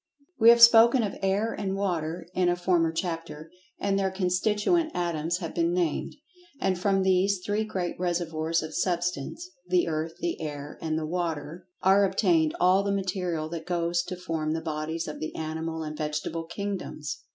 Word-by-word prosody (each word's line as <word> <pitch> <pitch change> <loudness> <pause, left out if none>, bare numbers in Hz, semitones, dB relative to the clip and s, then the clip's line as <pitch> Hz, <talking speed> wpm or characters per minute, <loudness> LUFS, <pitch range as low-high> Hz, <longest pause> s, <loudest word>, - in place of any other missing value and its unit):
We 230 0 +8
have 235 0 +8
spoken 235 +1 +8
of 205 - -2
Air 200 +4 +1
and 195 -1 -3
Water, 175 -4 -2
in 180 -1 +2
a 175 - +2
former 175 -2 +2
chapter, 165 -2 -5 0.3
and 200 -1 0
their 195 -1 +1
constituent 205 - +1
atoms 170 -1 -1
have 170 -3 -6
been 170 +1 +1
named. 175 -4 -1 0.4
And 190 - +1
from 195 0 +2
these 190 +1 +2
three 210 +1 0
great 185 -6 -3
reservoirs 165 -2 -1
of 155 0 -7
Substance—the 180 - -1
Earth, 160 0 -2
the 170 -2 -3
Air, 145 -2 -6
and 160 -1 -1
the 160 - -2
Water—are 175 +4 0
obtained 175 -5 +2
all 185 +2 +5
the 200 0 -1
material 180 -5 -2
that 165 0 -6
goes 175 -1 0
to 180 - -5
form 165 -4 -2
the 165 - -1
bodies 160 +1 -3
of 150 - -6
the 155 - -5
animal 160 +1 -4
and 155 0 -5
vegetable 155 +2 -3
kingdoms. 170 -5 -5
175 Hz, 165 wpm, -27 LUFS, 160-195 Hz, 0.4 s, We